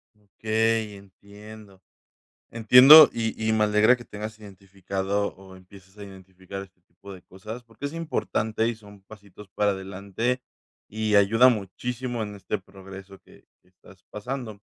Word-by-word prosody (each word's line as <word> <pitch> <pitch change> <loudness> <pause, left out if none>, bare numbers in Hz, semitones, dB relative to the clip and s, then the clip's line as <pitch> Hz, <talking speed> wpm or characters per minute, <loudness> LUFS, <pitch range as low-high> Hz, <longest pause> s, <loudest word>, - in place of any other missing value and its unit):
Okey, 110 +1 -2
entiendo. 100 +1 -15 0.7
Entiendo, 125 +6 +8
y 110 -1 -3
y - - +2
me 110 -1 +2
alegra 105 +4 +3
que 120 - -13
tengas 110 +1 -9
identificado 100 0 -5
o 95 0 -16
empieces 95 +1 -19
a 100 - -9
identificar 95 0 -11
este 95 -1 -17
este 85 -1 -42
tipo 100 +2 -13
de 90 - -15
cosas, 105 +6 -10
porque 115 +2 -15
es 145 - -7
importante 115 -9 -2
y 120 - -2
son 105 -2 -17
pasitos 100 0 -16
para 105 -1 +1
adelante. 100 +6 -4 0.5
Y 110 0 -2
ayuda 115 +5 +5
muchísimo 120 +3 -4
en 105 -1 -7
este 100 +1 -5
progreso 95 0 -14
que - - -22 0.2
que - - -31
estás 90 0 -21
pasando. 110 -1 -7
105 Hz, 150 wpm, -24 LUFS, 95-110 Hz, 0.7 s, Entiendo